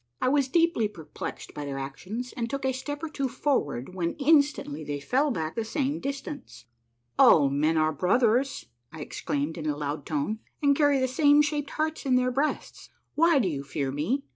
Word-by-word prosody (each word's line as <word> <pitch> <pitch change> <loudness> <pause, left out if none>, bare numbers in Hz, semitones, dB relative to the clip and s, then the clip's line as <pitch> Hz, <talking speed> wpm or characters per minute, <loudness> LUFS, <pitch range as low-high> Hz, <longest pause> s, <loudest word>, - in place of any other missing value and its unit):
I 255 - +2
was 280 -1 +2
deeply 330 -6 +2
perplexed 165 -7 -8
by 145 - -5
their 140 -1 -4
actions, 185 - -6
and 230 -1 -3
took 275 0 -3
a 260 - +1
step 290 +4 -5
or - - -1
two 275 -3 -2
for 285 +2 +1
ward 135 +3 -7
when 170 -2 -2
instantly 285 - +2
they 145 -1 -4
fell 265 - +1
back 160 - -2
the 230 - -2
same 275 +6 -1
distance. 275 - -6 0.3
" 120 0 -28
All 140 -3 +6
men 155 +3 +1
are 155 0 +2
brothers," 235 - +1 0.3
I 160 - -9
exclaimed 150 +2 -3
in 155 - -4
a 145 -1 -1
loud 145 0 -4
tone, 155 +9 -2
" - - -45
and 280 -1 +5
carry 290 -1 +3
the 260 -1 +1
same 290 +3 +5
shaped 290 -1 -2
hearts 315 0 -2
in 255 - +4
their 250 0 +2
breasts. 280 +4 -2 0.2
Why 330 0 +4
do 235 -8 +2
you 140 -5 -3
fear 140 -1 -3
me? 190 - -1
235 Hz, 205 wpm, -27 LUFS, -, 0.3 s, All